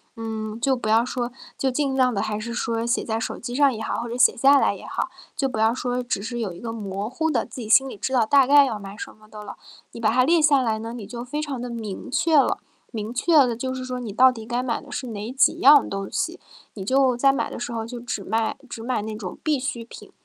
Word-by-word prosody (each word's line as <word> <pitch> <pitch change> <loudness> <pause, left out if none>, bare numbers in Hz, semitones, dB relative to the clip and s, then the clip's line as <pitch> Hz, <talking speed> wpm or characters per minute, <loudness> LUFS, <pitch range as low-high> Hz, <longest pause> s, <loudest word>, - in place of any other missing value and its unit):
嗯， 220 0 -5
就 265 +1 +2
不 240 - -5
要 225 +2 +4
说 245 -1 -3 0.3
就 265 - 0
尽 270 0 0
量 255 -2 +3
地 200 - -1
还 215 -1 -2
是 235 +2 -5
说 230 -1 -2
写 235 - 0
在 225 0 -2
手 - - -4
机 245 0 -6
上 280 -1 +4
也 220 - -6
好， - - -2
或 235 - -4
者 235 - -5
写 250 - +4
下 275 +3 +6
来 - - +2
也 - - -11
好， - - -3 0.3
就 270 -3 0
不 235 - -5
要 220 +1 +3
说 250 0 -2
只 240 -5 -2
是 240 +3 -5
有 205 -6 -3
一 175 - -11
个 230 - -4
模 205 -1 -4
糊 320 +5 -1
的， 235 - +1
自 - - -10
己 220 - -6
心 265 +4 +5
里 245 - -9
知 260 - -3
道 245 -3 +4
大 275 +3 +5
概 285 +1 +7
要 230 -5 -3
买 200 0 -9
什 - - -7
么 215 0 -21
的 215 -1 -10
了。 205 - -9 0.3
你 - - -10
把 220 -2 +2
它 255 +2 +4
列 335 +5 +4
下 290 -3 +5
来 225 -3 0
呢， 225 +1 -6
你 235 -4 -7
就 240 0 -7
非 295 +4 -3
常 285 -4 -4
地 245 - -5
明 220 -4 -6
确 315 +4 +2
了。 275 - +3 0.4
明 215 +1 -4
确 320 +7 +1
了 255 -6 +5
就 260 +3 -3
是 255 - -5
说 255 0 -4
你 230 -5 -6
到 255 +4 +6
底 225 -3 -9
该 240 +1 -1
买 245 -2 -2
的 285 - -14
是 255 - -4
哪 220 +1 -5
几 260 -1 +2
样 285 +1 +7
东 195 0 -4
西。 - - -2 0.4
你 195 -3 -6
就 260 +1 +3
在 275 +2 +4
买 235 -4 -1
的 - - -7
时 240 0 -4
候 225 -1 -4
就 245 0 -7
只 235 -4 -4
卖 220 +3 -1
只 225 - -7
买 240 -3 -1
那 215 0 -5
种 195 -4 -7
必 300 -4 +1
需 250 -3 -4
品， 230 - -13
240 Hz, 300 characters per minute, -23 LUFS, 220-260 Hz, 0.4 s, 概